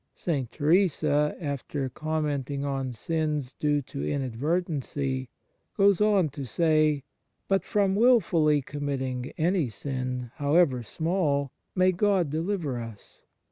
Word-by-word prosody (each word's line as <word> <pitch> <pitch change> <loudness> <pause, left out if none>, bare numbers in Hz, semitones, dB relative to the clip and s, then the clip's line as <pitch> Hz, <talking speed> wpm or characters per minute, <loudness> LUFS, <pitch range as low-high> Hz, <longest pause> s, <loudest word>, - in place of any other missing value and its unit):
St. 140 -8 -2
Teresa, 150 -2 +2
after 140 -3 -3
com 155 +4 -2
menting 140 -1 -2
on 135 -2 -2
sins 150 +1 -2
due 145 -1 0
to 70 - -6
inadvertency, 135 - -2 0.5
goes 200 -1 +4
on 205 -6 +4
to 140 0 -7
say: 155 +1 +2 0.2
" - - -50
But 195 0 +2
from 200 -2 +1
wilfully 175 - +4
committing 130 -3 -3
any 170 -4 +1
sin, 125 0 -4
however 145 -3 +3
small, 145 - -1 0.2
may 185 0 +4
God 185 -4 +1
deliver 160 -5 -2
us 115 -3 -11
150 Hz, 120 wpm, -27 LUFS, 135-170 Hz, 0.5 s, goes